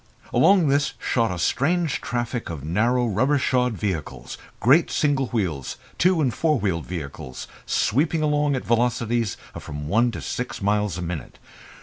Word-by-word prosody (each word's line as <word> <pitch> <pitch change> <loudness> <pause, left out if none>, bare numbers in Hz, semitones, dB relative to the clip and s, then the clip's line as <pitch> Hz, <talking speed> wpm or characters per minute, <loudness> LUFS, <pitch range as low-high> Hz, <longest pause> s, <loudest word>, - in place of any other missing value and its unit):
Along 190 -5 +5
this 140 0 +1
shot 115 -2 0
a 90 - -3
strange 150 - +1
traffic 120 0 -3
of 80 -5 -6
narrow 115 +10 +1
rubber 130 +7 +2
shod 125 -2 +1
vehicles, 95 -8 -4 0.2
great 140 +9 +4
single 140 -3 +1
wheels, 90 - -2 0.2
two 180 -2 +3
and 130 -5 +1
four 155 +4 +1
wheeled 90 -8 -2
vehicles, 70 -7 -6 0.2
sweeping 155 +7 +1
along 150 -1 +2
at 130 - -4
velocities 115 -2 +1 0.2
of - - -8
from 75 0 -6
one 115 +8 +3
to - - -6
six 125 0 -4
miles 105 -2 0
a 90 - -4
minute. 85 -5 -6
120 Hz, 155 wpm, -24 LUFS, 95-140 Hz, 0.2 s, Along